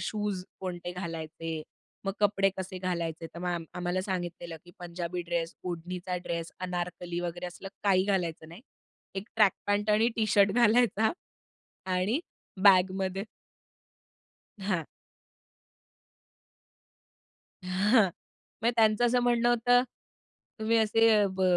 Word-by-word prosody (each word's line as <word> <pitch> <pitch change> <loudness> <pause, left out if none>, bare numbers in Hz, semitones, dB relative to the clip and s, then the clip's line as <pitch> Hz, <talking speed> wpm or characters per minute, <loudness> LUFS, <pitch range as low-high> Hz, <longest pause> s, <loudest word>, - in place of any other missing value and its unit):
Shoes 205 -3 -2 0.2
कोणते 175 -1 -4
घालायचे. 165 -2 -5 0.4
मग 195 - -1
कपडे 195 -1 +3
कसे 190 0 -5
घालायचे, 170 -3 -3
तर - - -7
मॅम 175 -2 -2
आम्हाला 180 +1 -1
सांगितलेलं, 175 -3 -4
की 175 - -14
पंजाबी 175 0 -4
ड्रेस, 170 -1 -2
ओढणीचा 180 +1 -4
ड्रेस, 170 -1 -3
अनारकली 175 -1 -3
वगैरे 175 0 -4
असलं 180 +2 -8 0.2
काही 190 -2 +4
घालायचं 175 -5 -1
नाही. 170 +5 -11 0.5
एक 195 +3 -5
ट्रॅक 210 -3 +6
पॅन्ट 205 +1 +1
आणि 215 +2 +4
टी 220 -2 +2
शर्ट 200 -1 +5
घालायचा 230 -1 +4 0.8
आणि 200 - +1 0.4
बॅगमध्ये 190 0 +4 1.4
हां. 190 -5 -1 2.8
हां. 200 +5 +4 0.6
म्हणजे 235 - +4
त्यांचं 220 +1 +4
असं 245 +1 +3
म्हणणं 240 -1 +3
होतं, 245 +1 +4 0.8
तुम्ही 220 +1 +2
असे 225 +1 +4
अ, 205 - +4
ब 190 - 0
185 Hz, 115 wpm, -29 LUFS, 175-210 Hz, 2.8 s, ट्रॅक